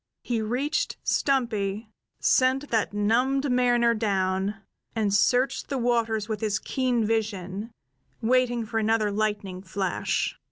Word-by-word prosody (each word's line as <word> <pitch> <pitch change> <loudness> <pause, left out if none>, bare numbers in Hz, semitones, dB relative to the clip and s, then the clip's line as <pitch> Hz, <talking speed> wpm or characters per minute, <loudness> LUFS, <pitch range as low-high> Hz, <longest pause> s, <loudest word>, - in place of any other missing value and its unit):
He 235 -3 -1
reached 255 +8 -1
Stumpy, 220 -5 0 0.3
sent 265 +2 +2
that 220 -2 +1
numbed 250 +7 +1
mariner 240 -1 +3
down, 195 -2 0 0.4
and 210 -3 +1
searched 250 +6 +2
the 275 - -1
waters 230 -3 0
with 215 -2 -3
his 210 -2 0
keen 250 -1 0
vision, 210 -2 -2 0.5
waiting 245 0 +2
for 225 +1 -2
another 220 -1 +1
lightning 205 -3 -2
flash. 190 0 -2
225 Hz, 120 wpm, -26 LUFS, 205-245 Hz, 0.5 s, mariner